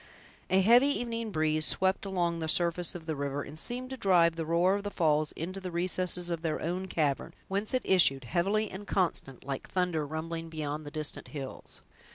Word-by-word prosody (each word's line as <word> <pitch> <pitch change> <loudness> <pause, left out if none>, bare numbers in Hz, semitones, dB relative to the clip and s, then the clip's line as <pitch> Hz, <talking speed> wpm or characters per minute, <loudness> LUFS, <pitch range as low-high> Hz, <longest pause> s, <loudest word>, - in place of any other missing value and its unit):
A 190 +1 +4
heavy 240 +7 +6
evening 230 -5 -2
breeze 155 -3 +1
swept 190 +4 +1
along 175 -3 0
the 160 - -2
surface 170 +1 +1
of 170 -2 -8
the 160 -1 -2
river, 140 0 -3
and 155 - -8
seemed 250 +7 -4
to 265 - -5
drive 175 -6 +4
the 165 -1 -4
roar 170 +3 +3
of 200 - -1
the 205 - -3
falls 155 -5 +1
into 185 +4 -5
the 185 - -4
recesses 180 0 +2
of 165 -1 -2
their 160 -2 -1
own 180 +3 -3
cavern, 150 -6 -1
whence 200 +2 +2
it 255 - 0
issued 135 -8 +4
heavily 195 - 0
and 200 +2 -8
constant, 165 -8 -1
like 135 -1 -5
thunder 180 -4 0
rumbling 165 +2 -5
beyond 155 -1 -4
the - - -4
distant 155 0 -3
hills. 135 -3 -7
170 Hz, 200 wpm, -30 LUFS, 155-190 Hz, -, heavy